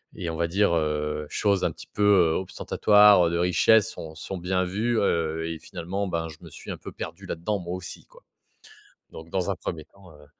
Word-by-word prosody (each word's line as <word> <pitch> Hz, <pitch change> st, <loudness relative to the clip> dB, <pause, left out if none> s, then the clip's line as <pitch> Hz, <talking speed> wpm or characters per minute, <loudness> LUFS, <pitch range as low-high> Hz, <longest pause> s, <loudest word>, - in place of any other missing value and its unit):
et 85 Hz, -, -4 dB
on -, -, -5 dB
va 85 Hz, -, 0 dB
dire, 95 Hz, 0 st, +2 dB
heu, 75 Hz, -1 st, -1 dB
choses 100 Hz, -3 st, +1 dB
un -, -, +1 dB
petit -, -, -12 dB
peu, 105 Hz, -, -4 dB
heu, 90 Hz, -6 st, +5 dB
ostentatoires, 105 Hz, 0 st, +4 dB
heu, 85 Hz, -, -1 dB
de 85 Hz, -, 0 dB
richesse 110 Hz, +5 st, +4 dB
sont 80 Hz, -7 st, -9 dB
sont 95 Hz, +3 st, -6 dB
bien 90 Hz, +1 st, 0 dB
vues, 110 Hz, +6 st, -1 dB
heu 80 Hz, -3 st, 0 dB
et 80 Hz, -1 st, -5 dB
finalement, 95 Hz, +3 st, -4 dB
ben, 85 Hz, -2 st, -2 dB
je 80 Hz, -, -11 dB
me -, -, -11 dB
suis -, -, -9 dB
un -, -, -5 dB
peu -, -, -9 dB
perdu 85 Hz, +5 st, -8 dB
là-dedans 95 Hz, +5 st, -2 dB
moi 90 Hz, 0 st, -5 dB
aussi, 90 Hz, -2 st, -9 dB
quoi. -, -, -20 dB, 0.9 s
Donc 80 Hz, +1 st, -11 dB
dans 95 Hz, 0 st, -1 dB
un -, -, -2 dB
1er 80 Hz, -3 st, -6 dB
temps, 95 Hz, -3 st, -18 dB
heu 75 Hz, 0 st, -17 dB
90 Hz, 220 wpm, -25 LUFS, 80-100 Hz, 0.9 s, heu